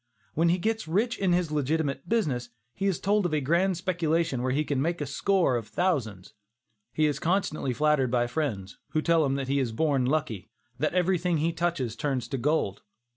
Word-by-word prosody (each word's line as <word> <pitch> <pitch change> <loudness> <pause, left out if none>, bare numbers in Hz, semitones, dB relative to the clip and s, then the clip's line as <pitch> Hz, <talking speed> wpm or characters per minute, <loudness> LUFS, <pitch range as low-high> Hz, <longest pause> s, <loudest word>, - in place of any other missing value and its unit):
When 165 +2 +2
he 175 - +3
gets 220 +1 -2
rich 220 +9 0
in 190 -2 +2
his 175 -3 +1
legitimate 145 -1 -1
business, 140 - 0 0.2
he 195 - -1
is 190 - 0
told 205 -1 +2
of 155 - -1
a - - +2
grand 170 +6 +1
speculation 165 -6 0
where 130 +1 0
he 145 +4 +1
can 140 -3 -1
make 170 +4 -1
a 145 - -2
score 175 +1 +1
of 115 -2 -6
thousands. 115 - -1 0.6
He 155 - +1
is 145 -2 0
constantly 175 -6 0
flattered 150 -1 +2
by 120 0 +2
his 120 - -4
friends, 110 -11 -3
who 155 - +1
tell 165 -1 +3
him 135 -1 +1
that 135 -1 -3
he 140 +1 +1
is 125 -4 -1
born 135 0 +1
lucky, 140 -9 -2 0.3
that - - 0
everything 180 -1 +2
he 165 +2 0
touches 165 -10 -1
turns 130 -2 -2
into 130 +3 -4
gold. 140 -8 0
155 Hz, 205 wpm, -27 LUFS, 130-175 Hz, 0.6 s, he